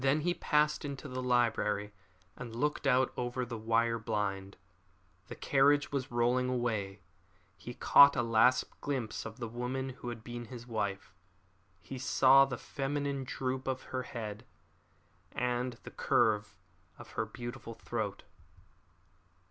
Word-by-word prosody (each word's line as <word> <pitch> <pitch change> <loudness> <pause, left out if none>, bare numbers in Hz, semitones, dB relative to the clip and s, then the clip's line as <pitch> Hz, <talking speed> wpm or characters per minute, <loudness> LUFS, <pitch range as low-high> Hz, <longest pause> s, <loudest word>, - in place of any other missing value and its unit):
Then 135 +3 +3
he 175 +3 +1
passed 150 -2 +1
into 140 0 -6
the 130 -1 -4
library 115 -4 +1 0.4
and 120 -2 -8
looked 145 +3 -1
out 130 0 +3
over 125 +1 -2
the 120 0 -6
wire 115 +1 +1
blind. 100 -3 -3 0.7
The - - -8
carriage 145 +1 +3
was 140 -1 -2
rolling 125 +2 +1
away. 110 -6 -2 0.5
He 120 - -9
caught 140 0 +7
a 120 - +1
last 115 +2 +4 0.2
glimpse 130 -7 -3
of 110 +1 -10
the 120 - -3
woman 125 +3 -3
who 125 -1 -7
had 115 -2 -7
been 120 0 -6
his 120 0 -9
wife. 100 -5 -3 0.7
He 130 +7 -8
saw 135 +1 +6
the 130 -3 -5
feminine 140 0 -3
droop 130 0 -3
of 130 -1 -2
her 130 - 0
head, 110 -3 -6 0.9
and 125 0 -1
the - - -9
curve 105 -3 +1 0.4
of - - -12
her - - -2
beautiful 120 -1 -7
throat. - - -4
125 Hz, 140 wpm, -32 LUFS, 115-135 Hz, 0.9 s, caught